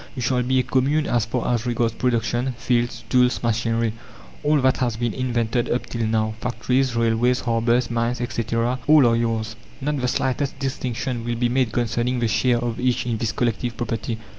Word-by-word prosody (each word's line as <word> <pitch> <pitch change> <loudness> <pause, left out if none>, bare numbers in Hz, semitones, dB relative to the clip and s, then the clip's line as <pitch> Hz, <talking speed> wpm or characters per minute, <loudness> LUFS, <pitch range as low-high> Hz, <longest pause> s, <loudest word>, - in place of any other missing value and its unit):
"You 130 - -4
shall 125 +1 +1
be 130 +1 +1
a 130 - +3
Commune 140 +5 +1
as 120 -3 +1
far 115 +2 -1
as 120 0 -1
regards 120 -1 0
production: 120 +1 0
fields, 120 0 0
tools, 125 -1 +2
machinery, 115 0 0 0.5
all 150 0 +3
that 130 0 +3
has 120 -4 -1
been 120 -2 -1
invented 120 -2 -1
up 120 - 0
till 115 -2 -2
now 110 0 0
factories, 125 +1 0
railways, 115 +2 +2
harbours, 120 +1 +1
mines, 115 +1 0
etc., 120 +1 -1
all 150 -3 +7
are 115 -1 +4
yours. 115 -1 -1 0.2
Not 145 0 -2
the 125 - +1
slightest 130 +2 -1
distinction 130 -3 -3
will 120 0 -2
be 120 +1 +1
made 125 -2 +1
concerning 120 +2 0
the 120 - +1
share 120 +3 +2
of 120 -1 -3
each 125 -1 +1
in 120 -2 -1
this 110 -1 -1
collective 120 0 -1
property. 115 -1 -3
120 Hz, 190 wpm, -23 LUFS, 115-125 Hz, 0.5 s, all